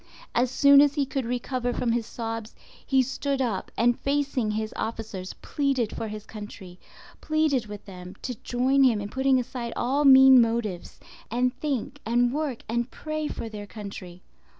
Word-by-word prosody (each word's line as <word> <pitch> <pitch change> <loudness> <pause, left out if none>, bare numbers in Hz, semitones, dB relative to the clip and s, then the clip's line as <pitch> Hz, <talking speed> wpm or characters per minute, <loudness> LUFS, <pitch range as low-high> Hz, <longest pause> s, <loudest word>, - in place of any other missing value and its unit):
As 245 +1 +2
soon 280 +2 +6
as 290 0 +3
he 285 -2 +1
could 270 -1 -3
recover 245 +1 -2
from 240 - 0
his 230 -1 -1
sobs, 225 -1 -5 0.3
he 265 -2 +3
stood 270 +2 -2
up 235 -7 -2
and, 240 +1 +3
facing 275 -5 0
his 215 0 -3
officers, 220 -4 -5
pleaded 275 -6 -1
for 225 - -4
his 215 0 -7
country—pleaded 225 - -4
with 205 -1 -9
them 180 -1 -10
to 255 - -3
join 260 +3 +1
him 240 -5 +4
in 205 0 -5
putting 265 +2 +2
aside 240 -1 -5
all 270 +5 +1
mean 265 -2 +9
motives, 225 -6 -2 0.3
and 250 +2 +1
think 275 0 -3
and 240 +2 +2
work 290 -5 -3
and 235 +2 -1
pray 310 0 -4
for 230 - -5
their 210 -2 -8
country. 195 -4 -9
240 Hz, 165 wpm, -26 LUFS, 220-270 Hz, 0.3 s, mean